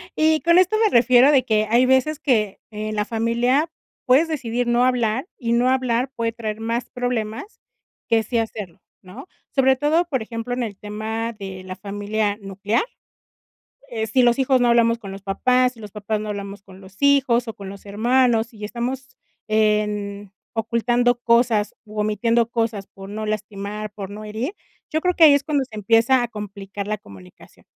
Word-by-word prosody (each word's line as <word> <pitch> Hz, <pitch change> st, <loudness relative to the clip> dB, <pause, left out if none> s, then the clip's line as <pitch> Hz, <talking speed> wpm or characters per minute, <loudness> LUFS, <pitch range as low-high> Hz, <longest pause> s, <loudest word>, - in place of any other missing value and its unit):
Y 315 Hz, 0 st, +3 dB
con 340 Hz, +2 st, +4 dB
esto 370 Hz, +4 st, +3 dB
me 435 Hz, -, +4 dB
refiero 250 Hz, +3 st, +6 dB
de 270 Hz, -3 st, +4 dB
que, 215 Hz, -2 st, +2 dB
hay 240 Hz, +3 st, +4 dB
veces 265 Hz, +4 st, +2 dB
que, 215 Hz, -9 st, 0 dB
en 215 Hz, 0 st, -4 dB
la 210 Hz, 0 st, 0 dB
familia 240 Hz, +7 st, +1 dB, 0.3 s
puedes 275 Hz, +6 st, +4 dB
decidir 245 Hz, -5 st, -2 dB
no 240 Hz, +1 st, +3 dB
hablar, 250 Hz, -, +1 dB
y 235 Hz, -2 st, -1 dB
no 245 Hz, +2 st, +3 dB
hablar 255 Hz, 0 st, 0 dB
puede 230 Hz, 0 st, -1 dB
traer 220 Hz, -2 st, -5 dB
más 230 Hz, +2 st, -3 dB
problemas 245 Hz, -, -4 dB, 0.5 s
que 225 Hz, -1 st, +3 dB
sí 235 Hz, +3 st, -2 dB
hacerlo, 215 Hz, -6 st, -4 dB, 0.2 s
¿no? 185 Hz, -, -11 dB, 0.3 s
Sobre 265 Hz, -1 st, +4 dB
todo, 310 Hz, +5 st, +2 dB
por 275 Hz, -8 st, -2 dB
ejemplo, 230 Hz, +2 st, -5 dB
en 245 Hz, 0 st, -1 dB
el 205 Hz, -4 st, -5 dB
tema 220 Hz, +2 st, -4 dB
de 195 Hz, -3 st, -8 dB
la 185 Hz, 0 st, -7 dB
familia 205 Hz, +1 st, -2 dB
nuclear, 200 Hz, +3 st, -1 dB, 1.1 s
eh, 220 Hz, -2 st, -3 dB
si 250 Hz, +3 st, +3 dB
los 240 Hz, +1 st, +3 dB
hijos 260 Hz, -1 st, +3 dB
no 245 Hz, -, +3 dB
hablamos 235 Hz, 0 st, +4 dB
con 200 Hz, -4 st, -9 dB
los 195 Hz, -, -8 dB
papás, 250 Hz, +6 st, +2 dB
si 230 Hz, -, -18 dB
los 210 Hz, -2 st, -9 dB
papás 210 Hz, +1 st, -3 dB
no 215 Hz, 0 st, -5 dB
hablamos 200 Hz, -1 st, -6 dB
con 190 Hz, 0 st, -15 dB
los 190 Hz, +1 st, -16 dB
hijos 270 Hz, -4 st, +3 dB
o 225 Hz, -, -4 dB
con 200 Hz, -2 st, -9 dB
los 200 Hz, +1 st, -11 dB
hermanos, 230 Hz, +2 st, +2 dB
y 210 Hz, -1 st, -11 dB
estamos 250 Hz, +4 st, -4 dB, 0.4 s
en 210 Hz, -2 st, 0 dB, 0.2 s
ocultando 240 Hz, +2 st, +1 dB
cosas 235 Hz, -3 st, +2 dB
u 215 Hz, 0 st, -8 dB
omitiendo 225 Hz, +2 st, +1 dB
cosas 225 Hz, -4 st, -2 dB
por 195 Hz, 0 st, -12 dB
no 215 Hz, +1 st, -5 dB
lastimar, 210 Hz, 0 st, -4 dB
por 200 Hz, -2 st, -7 dB
no 210 Hz, +1 st, -8 dB
herir, 220 Hz, -, -4 dB, 0.4 s
yo 315 Hz, -, 0 dB
creo 360 Hz, +1 st, +1 dB
que 330 Hz, -, +4 dB
ahí 295 Hz, -, +8 dB
es 285 Hz, 0 st, +2 dB
cuando 285 Hz, -3 st, 0 dB
se 225 Hz, -, -13 dB
empieza 225 Hz, +5 st, +3 dB
a -, -, -2 dB
complicar 200 Hz, -2 st, -7 dB
la 215 Hz, -, -1 dB
comunicación. 95 Hz, -, -16 dB
230 Hz, 185 wpm, -22 LUFS, 210-250 Hz, 1.1 s, ahí